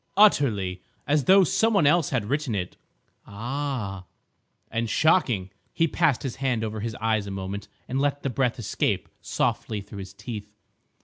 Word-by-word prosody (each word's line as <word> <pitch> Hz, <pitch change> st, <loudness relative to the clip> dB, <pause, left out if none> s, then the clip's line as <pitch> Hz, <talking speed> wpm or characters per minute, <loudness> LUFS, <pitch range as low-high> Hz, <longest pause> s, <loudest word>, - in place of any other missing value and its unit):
"Utterly! 105 Hz, -, +4 dB, 0.2 s
As 145 Hz, 0 st, +2 dB
though 190 Hz, +1 st, +7 dB
some 225 Hz, +6 st, +2 dB
one 195 Hz, -, +4 dB
else 160 Hz, +1 st, +4 dB
had 125 Hz, -6 st, 0 dB
written 140 Hz, -1 st, -1 dB
it—" 90 Hz, -3 st, -3 dB, 0.5 s
"Ah!" 115 Hz, -3 st, -4 dB, 0.7 s
"And 115 Hz, 0 st, -1 dB
shocking!" 120 Hz, -, +2 dB, 0.2 s
He 165 Hz, -, +2 dB
passed 155 Hz, -4 st, +1 dB
his 130 Hz, -2 st, -4 dB
hand 130 Hz, -4 st, 0 dB
over 110 Hz, 0 st, -3 dB
his 110 Hz, +1 st, -4 dB
eyes 110 Hz, -2 st, 0 dB
a -, -, -4 dB
moment 95 Hz, +1 st, -5 dB, 0.2 s
and 130 Hz, +2 st, -1 dB
let 145 Hz, 0 st, 0 dB
the 135 Hz, -, -1 dB
breath 125 Hz, 0 st, 0 dB
escape 115 Hz, -, -1 dB
softly 110 Hz, -, -1 dB
through 100 Hz, 0 st, -9 dB
his 95 Hz, -1 st, -8 dB
teeth. 105 Hz, -1 st, -7 dB
120 Hz, 165 wpm, -26 LUFS, 100-145 Hz, 0.7 s, though